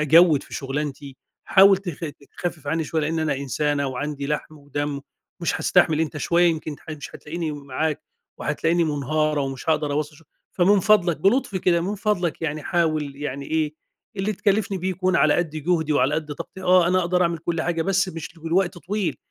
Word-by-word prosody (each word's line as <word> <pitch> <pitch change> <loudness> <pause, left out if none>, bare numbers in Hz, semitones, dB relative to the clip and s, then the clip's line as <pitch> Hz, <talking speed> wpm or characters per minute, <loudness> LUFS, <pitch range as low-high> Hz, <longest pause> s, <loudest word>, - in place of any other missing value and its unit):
أجود 155 0 +6
في - - -11
شغلانتي، 140 0 -4 0.3
حاول 195 0 +7
تف 175 -4 -6 0.3
تخفف 170 -4 -4
عنّي 160 +2 0
شويّة 160 +1 -1
لإني 160 +1 0
أنا 150 -3 0
إنسانة 140 +1 -1
وعندي 140 +2 -4
لحم 150 +1 -3
ودم، 145 0 -3 0.4
ومش 170 - 0
هاستحمل 165 -4 +3
أنتَ 155 -2 -2
شويّة 170 +4 +2
يمكن 155 -2 -4
ح 160 - -11
مش 150 -2 -7
هتلاقيني 160 0 -4
معاك 145 +2 -3 0.4
وهتلاقيني 165 +3 +1
منهارة 150 0 0
ومش 135 +2 -4
هاقدر 150 -2 +1
أواصل 150 0 -2
شغل، 165 - -20 0.3
فمن 195 +2 +4
فضلك- 185 -5 +4
بلطف 200 0 +2
كده- 170 -2 +2
مِن 200 +4 -2
فضلك 185 -6 -1
يعني 155 -1 -2
حاول 155 -5 0
يعني 140 -1 -5
إيه، 155 -1 -1 0.4
اللي 195 +3 0
تكلفني 200 0 0
بيه 185 +2 -1
يكون 185 0 +1
على 155 -1 +4
قد 175 -3 0
جهدي 155 0 0
وعلى 145 0 +2
قد 155 -1 -3
طاقتي، 190 - -9
آه 180 -1 +5
أنا 185 +1 +3
أقدر 180 +1 +1
أعمل 170 -1 0
كل 165 0 -2
حاجة 165 -1 0
بس 195 0 +1
مش 165 0 -7
لوقت 175 +2 0
طويل، 195 +1 -2
160 Hz, 185 wpm, -23 LUFS, 150-175 Hz, 0.4 s, حاول